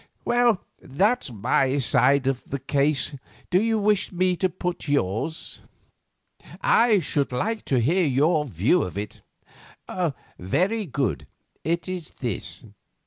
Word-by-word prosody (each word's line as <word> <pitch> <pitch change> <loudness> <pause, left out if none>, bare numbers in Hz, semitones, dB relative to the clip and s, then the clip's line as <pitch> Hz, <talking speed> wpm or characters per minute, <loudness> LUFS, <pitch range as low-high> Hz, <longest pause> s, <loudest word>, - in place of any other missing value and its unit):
Well, 240 -4 +2 0.2
that's 195 - 0
my 130 +5 +1
side 135 +1 +4
of 135 -1 -1
the 140 - -4
case. 140 +3 0 0.4
Do 185 +1 +4
you 225 0 +1
wish 210 -1 +1
me 185 0 +1
to 185 - +1
put 180 -2 -4
yours?" 140 - -2 1.0
"I 230 -3 +4
should 145 -3 -1
like 215 - -2
to 130 - +1
hear 165 +8 +2
your 150 +4 +2
view 115 - +2
of 90 - -4
it." 105 0 -6 1.2
"Very 190 - 0
good, 135 -5 -2 0.4
it 170 +4 -1
is 180 -4 -5
this. 120 -7 -4
155 Hz, 130 wpm, -24 LUFS, 130-185 Hz, 1.2 s, side